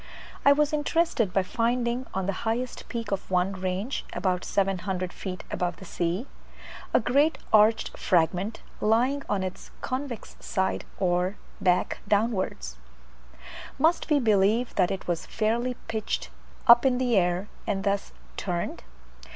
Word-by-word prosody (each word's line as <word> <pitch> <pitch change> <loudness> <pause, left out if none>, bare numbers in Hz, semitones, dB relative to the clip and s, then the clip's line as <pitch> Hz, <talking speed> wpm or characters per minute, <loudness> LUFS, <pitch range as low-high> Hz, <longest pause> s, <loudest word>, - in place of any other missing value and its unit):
I 280 - +7
was 295 +1 +3
interested 300 - +1
by 195 0 +2
finding 235 +4 0
on 190 -1 -2
the 200 - 0
highest 235 +2 -3
peak 230 -3 -4
of 195 -1 -2
one 185 +1 +1
range 190 +6 -2
(about 180 -2 0
700 190 -2 -1
feet 185 -2 -6
above 175 -1 -1
the 190 - -11
sea) 175 +6 -2 0.7
a - - +5
great 285 +5 +3 0.2
arched 215 +1 +4
fragment, 180 +4 +1 0.2
lying 245 +6 +2
on 195 -2 0
its 185 0 -6
convex 255 -3 -4
side, 190 0 -1
or 180 +1 +1 0.3
back 180 -2 +2
downwards. 195 - 0 1.0
Must 320 +6 +2
we 300 -2 +4
believe 220 +1 +3
that 185 -3 +2
it 190 - -4
was 175 -2 -2
fairly 235 +3 0
pitched 220 -1 -3 0.3
up 240 -1 +8
in 260 -2 +3
the 250 -2 +1
air, 180 +1 +2 0.2
and 195 -2 -1
thus 200 0 0 0.3
turned? 175 -2 -3
205 Hz, 140 wpm, -27 LUFS, 185-240 Hz, 1.0 s, up